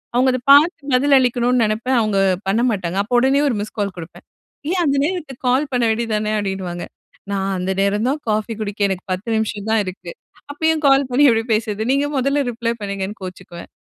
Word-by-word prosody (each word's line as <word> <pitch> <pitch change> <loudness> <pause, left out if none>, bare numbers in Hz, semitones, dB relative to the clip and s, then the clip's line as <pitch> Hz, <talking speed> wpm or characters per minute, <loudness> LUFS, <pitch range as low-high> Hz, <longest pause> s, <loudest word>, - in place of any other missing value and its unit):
அவங்க 255 +2 +3
அத 255 - -1
பாத்து 295 +4 +5
பதில் 280 +2 +4
அளிக்கணும்னு 245 -1 +2
நினைப்பேன். 230 +4 0
அவங்க 215 -2 0 0.3
பண்ண 220 +5 +1
மாட்டாங்க. 190 -3 -2
அப்போ 240 +4 -2
உடனே 270 +2 +3
ஒரு 245 - 0
மிஸ்கால் 205 -2 -4
குடுப்பேன். 165 0 -10 0.5
"ஏன் 365 -1 +1
அந்த 280 -1 +1
நேரத்துக்கு 305 -8 -5
கால் 270 +4 +2
பண்ண 245 -1 0
வேண்டியது 225 0 -1
தான" 215 0 -1
அப்டின்னுவாங்க. 190 -3 -4 0.5
நான் 195 0 -1
அந்த 185 +1 -2
நேரம் 205 +4 +1
தான் 295 +2 -1
"காஃபி 215 +2 -1
குடிக்க 210 -1 -5
எனக்கு 185 -1 -4
10 185 +5 -3
நிமிஷம் 215 -1 -3
தான் 220 -1 +3
இருக்கு. 185 - -7 0.4
அப்பயும் 320 +1 0
கால் 270 -1 +4
பண்ணி 285 +4 +4
எப்டி 225 0 +1
பேசுறது? 215 -1 -1
நீங்க 285 +1 +1
முதல்ல 275 +2 +1
ரிப்ளை 235 0 -2
பண்ணுங்கன்னு" 200 +1 -4
கோச்சுக்குவேன். 180 -1 -9
225 Hz, 185 wpm, -19 LUFS, 200-265 Hz, 0.5 s, பாத்து